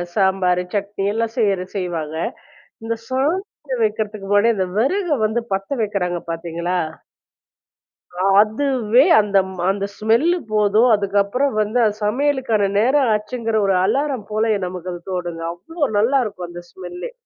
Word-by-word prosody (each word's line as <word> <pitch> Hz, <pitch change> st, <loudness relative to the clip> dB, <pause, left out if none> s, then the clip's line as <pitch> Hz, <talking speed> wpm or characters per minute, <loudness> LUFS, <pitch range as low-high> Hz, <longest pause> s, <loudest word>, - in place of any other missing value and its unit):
சாம்பாரு, 190 Hz, -2 st, +2 dB
சட்னி 200 Hz, -1 st, -2 dB
எல்லாம் 225 Hz, 0 st, -1 dB
செய்யிற 200 Hz, -5 st, +1 dB
செய்வாங்க. 165 Hz, -5 st, -3 dB, 0.7 s
இந்த 230 Hz, 0 st, -1 dB
சாதம் 275 Hz, -, -2 dB
வைக்கிறதுக்கு 215 Hz, -1 st, -2 dB
முன்னாடி, 205 Hz, +3 st, +4 dB
அந்த 190 Hz, -1 st, 0 dB
விறக 360 Hz, -, +1 dB, 0.2 s
வந்து 225 Hz, +2 st, -1 dB
பத்த 195 Hz, 0 st, -2 dB
வைக்கிறாங்க 180 Hz, -4 st, -1 dB
பார்த்தீங்களா? 170 Hz, +2 st, -2 dB, 1.4 s
அ -, -, +1 dB, 0.2 s
அதுவே 240 Hz, +1 st, +2 dB, 0.2 s
அந்தம் 195 Hz, -2 st, +2 dB, 0.2 s
அந்த 195 Hz, 0 st, 0 dB
ஸ்மெல்லு 235 Hz, +12 st, +2 dB, 0.2 s
போதும். 215 Hz, +3 st, +4 dB
அதுக்கப்புறம் 205 Hz, +7 st, 0 dB
வந்து 215 Hz, +4 st, 0 dB
அது 210 Hz, -2 st, +2 dB
சமையலுக்கான 245 Hz, -3 st, +1 dB
நேரம் 260 Hz, +3 st, +3 dB
ஆச்சுங்கிற 220 Hz, +1 st, -2 dB
ஒரு 195 Hz, -, +3 dB
அலாரம் 270 Hz, 0 st, 0 dB
போலயே 215 Hz, 0 st, +1 dB
நமக்கு 180 Hz, 0 st, -6 dB
அது 175 Hz, -, -8 dB
தோணுது. 175 Hz, -2 st, -4 dB
அவ்ளோ 305 Hz, -, -6 dB
நல்லாயிருக்கும் 215 Hz, -5 st, +1 dB
அந்த 175 Hz, 0 st, -9 dB
ஸ்மெல்லே! 180 Hz, -, -7 dB
210 Hz, 130 wpm, -20 LUFS, 190-245 Hz, 1.4 s, முன்னாடி